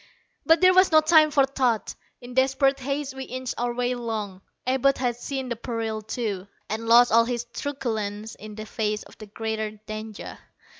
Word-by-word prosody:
But 325 0 +5
there 370 0 +7
was 370 0 +5
no 315 - +8
time 310 0 +5
for 280 -2 +4
thought. 255 -6 0 0.3
In 245 0 -10
desperate 270 +1 +2
haste, 275 +1 -3
we 265 0 -6
inched 255 0 -4
our 240 0 0
way 245 +1 -1
along. 220 -6 -4 0.2
Abud 265 +2 +2
had 245 -2 0
seen 265 +2 -4
the 235 - -2
peril, 225 -2 -3
too, 210 -3 -4 0.2
and 225 +1 -3
lost 240 +1 +7
all 230 +1 +5
his 240 -1 -3
truculence 220 -6 -3
in 215 0 -10
the 215 0 -7
face 215 -1 -2
of - - -17
the 215 - -9
greater 220 +1 -3 0.2
danger. 215 0 -7
240 Hz, 185 wpm, -25 LUFS, 220-265 Hz, 0.3 s, no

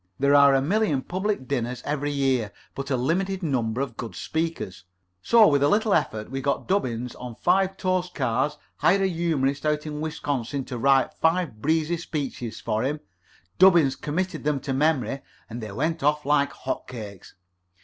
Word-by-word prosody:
There 140 +1 +3
are 140 -1 +7
a 135 - +2
million 170 -5 +1
public 190 -6 -2
dinners 125 -2 -2
every 145 0 -1
year, 135 -6 0 0.2
but 135 0 -5
a 130 - +1
limited 185 +9 0
supply 130 -6 0
of 125 -5 -7
good 115 -7 -6
speakers; 160 - -3 0.4
so, 230 -2 +6
with 140 -2 +3
a 145 - +4
little 215 +2 +2
effort, 110 -8 -1
we 135 0 -3
got 140 - -1
Dubbins 125 - -1
on 125 -2 -7
five 190 - +2
toast 185 -1 -1
cards, 130 +1 0 0.2
hired 195 +1 +3
a - - +3
humorist 160 -6 0
out 150 0 0
in 150 -1 -5
Wisconsin 140 -4 -3
to 125 -3 -6
write 135 +1 +3
five 160 -9 0
breezy 160 +3 +1
speeches 140 -8 -5
for 110 +1 -1
him, 145 +4 -1 0.6
Dubbins 170 -8 +6
committed 175 +2 -3
them 150 -1 0
to 135 - -3
memory, 135 -3 +1 0.3
and 120 +1 -7
they 110 -2 -6
went 155 +10 -1
off 150 +1 +1
like 145 0 +2
hot 130 - -5
cakes. 105 -6 -9
145 Hz, 175 wpm, -25 LUFS, 130-165 Hz, 0.6 s, are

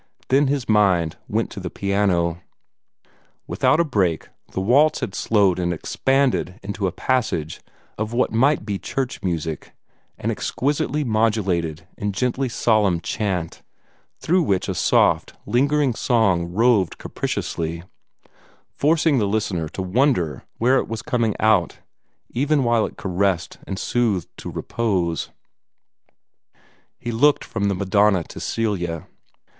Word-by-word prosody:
Then 135 +2 +4
his 140 -2 -1
mind 95 -7 +3
went - - -1
to - - -7
the - - -5
piano. 90 -4 0 1.0
Without 155 - +2
a - - +5
break 95 - 0 0.2
the - - -3
waltz 140 +10 +3
had 95 - -3
slowed 100 -5 +2
and 85 -1 0
expanded 130 - 0
into 100 0 -2
a - - -2
passage 100 - -1 0.4
of 110 0 -2
what 120 +2 +1
might 130 +2 +2
be 100 -3 -3
church 135 -2 -3
music, 80 -4 -3 0.4
an - - -2
exquisitely 145 +2 -1
modulated 100 - 0
and 100 -1 -2
gently 125 +4 0
solemn 105 -7 +2
chant, 90 -3 -3 0.6
through 180 +3 +2
which 100 - 0
a - - -1
soft, - - +2
lingering 140 +1 +2
song 95 -8 +1
roved 105 -3 +2
capriciously, 85 0 -3 0.9
forcing 155 -2 +2
the 105 - +1
listener 100 -6 -1
to 95 - -5
wonder 95 - +1
where 125 +3 +3
it - - -3
was 115 0 -5
coming 120 -5 0
out, 105 -6 +2 0.5
even 145 +3 +1
while 120 -2 +2
it - - -13
caressed 95 -2 -1
and 95 - -4
soothed 105 -7 0
to - - -7
repose. 95 -8 -1 1.7
He 120 - -5
looked 145 +6 +3
from 105 -3 -3
the 100 -1 +1
Madonna 100 -1 +2
to - - -10
Celia. 90 -7 -2
105 Hz, 130 wpm, -22 LUFS, 90-125 Hz, 1.7 s, a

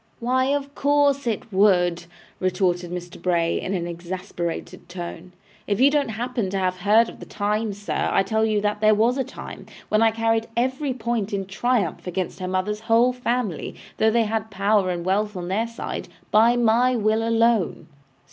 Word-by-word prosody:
'Why, 255 +2 +1
of 280 +1 -1
course 285 -2 +2
it 220 -1 -3
would,' 180 -3 +3 0.3
retorted 180 -1 0
Mr. 175 0 -7
Bray, 170 -2 +1
in 195 - -2
an 170 -2 -2
exasperated 175 0 -5
tone. 175 0 -7 0.4
'If 205 -1 0
you 275 +2 +6
don't 285 -4 +1
happen 230 -2 -2
to 195 - -2
have 185 -1 0
heard 215 +5 +4
of - - -11
the - - -9
time, 210 +1 -1
sir, 205 +1 -2
I 195 - +3
tell 220 +3 0
you 215 -2 +1
that 210 0 -1
there 215 0 +5
was 235 +5 +2
a - - +2
time, - - -10 0.2
when 215 - +3
I 225 - +6
carried 225 0 0
every 260 +2 0
point 230 -4 -2
in 195 -1 -1
triumph 215 +1 -1
against 180 +1 -3
her 185 - -4
mother's 185 +3 -1
whole 235 +3 +5
family, 245 -7 -2 0.2
although 220 - +4
they 230 +1 +3
had 220 0 -2
power 200 -1 +2
and 175 -1 -3
wealth 205 +2 0
on 175 -1 -5
their 220 +5 0
side, 230 - -6 0.2
by 225 +3 +5
my 240 +2 +3
will 220 0 +1
alone. 230 -3 +1
215 Hz, 185 wpm, -23 LUFS, 185-235 Hz, 0.4 s, you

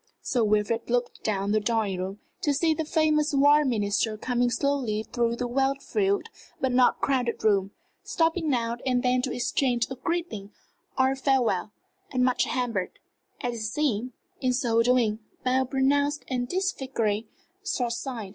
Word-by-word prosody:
Sir 245 -3 +1
Wilfrid 215 +2 +1
looked 245 0 -1
down 200 -1 0
the 215 - +3
drawing 210 -3 0
room, 190 +2 -4 0.2
to 290 -1 +1
see 320 +3 +2
the 315 +1 -3
famous 305 -2 +2
War 290 +2 +6
Minister 215 -3 0
coming 245 +1 0
slowly 240 -4 0
through 235 0 -1
the 245 - -3
well 270 +3 +1
filled 395 +8 -1 0.3
but 265 - 0
not 250 0 +3
crowded 255 -4 0
room, 195 -3 +3 0.3
stopping 325 -1 0
now 235 -3 0
and 250 -1 +1
then 250 0 +2
to 255 - -2
exchange 245 -1 0
a - - -3
greeting 330 - -3 0.5
or 260 0 +4
a - - -1
farewell, 250 -9 +1 0.4
and 250 -1 +2
much 255 -1 +2
hampered, 230 -8 -2 0.4
as 245 -1 -2
it 230 - -6
seemed, 250 -1 -1 0.3
in 255 -2 +1
so 235 -2 +2
doing, 230 -3 +2 0.3
by 255 +1 +3
a 260 - +1
pronounced 285 +2 +1
and 250 -2 -2
disfiguring 265 - -1 0.4
short 250 - -1
sight. 235 -5 -5
250 Hz, 165 wpm, -26 LUFS, 225-275 Hz, 0.5 s, War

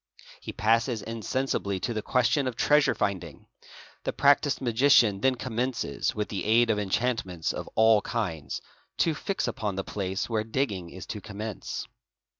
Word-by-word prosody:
He - - -7
passes 115 +1 +1
insensibly 115 -3 -2
to 120 - -1
the 110 - -2
question 125 +4 +2
of 125 - -3
treasure 150 +3 +3
finding. 90 -6 -3 0.6
The - - -1
practised 145 0 +3
magician 120 -5 +4
then 130 +2 +3
commences, 120 - -2
with 105 -1 -2
the 100 - -3
aid 115 +2 +4
of 105 - 0
enchantments 100 -4 -1
of - - -6
all 110 -1 +5
kinds, 80 -11 -3 0.4
to 165 - +2
fix 195 +5 -2
upon 105 -3 -2
the 95 - -2
place 95 -1 -3
where 110 -2 0
digging 110 -7 -2
is 90 +1 -9
to 105 - -6
commence. 105 0 -6
110 Hz, 155 wpm, -27 LUFS, 100-125 Hz, 0.6 s, all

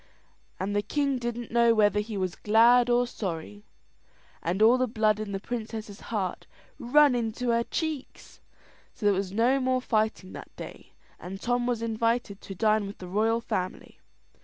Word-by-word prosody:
And 200 +2 -2
the 205 - +2
king 275 +5 -1
didn't 240 -1 -4
know 235 0 +4
whether 210 -1 +3
he 210 0 -4
was 185 -2 -1
glad 235 +3 +4
or 245 0 +3
sorry, 160 - -6 0.8
and 175 +4 -2
all 230 +4 +6
the 255 - +2
blood 215 -2 +1
in 215 -2 -4
the 195 - -3
princess's 220 -2 -6
heart 195 -5 -3 0.3
run 285 +3 +5
into 240 +1 -2
her 235 0 +3
cheeks. 310 0 -5 0.5
So 210 - -6
there 205 - +5
was 190 -1 -2
no 240 +6 +2
more 255 -1 +1
fighting 215 -5 -1
that - - -10
day, - - -10 0.3
and 190 +2 -7
Tom 245 +2 0
was 235 -2 -1
invited 230 -2 -1
to 195 - -8
dine 215 0 +2
with 200 - -9
the 180 - -9
royal 220 +5 +1
family. 185 -5 -4
220 Hz, 170 wpm, -27 LUFS, 200-240 Hz, 0.8 s, all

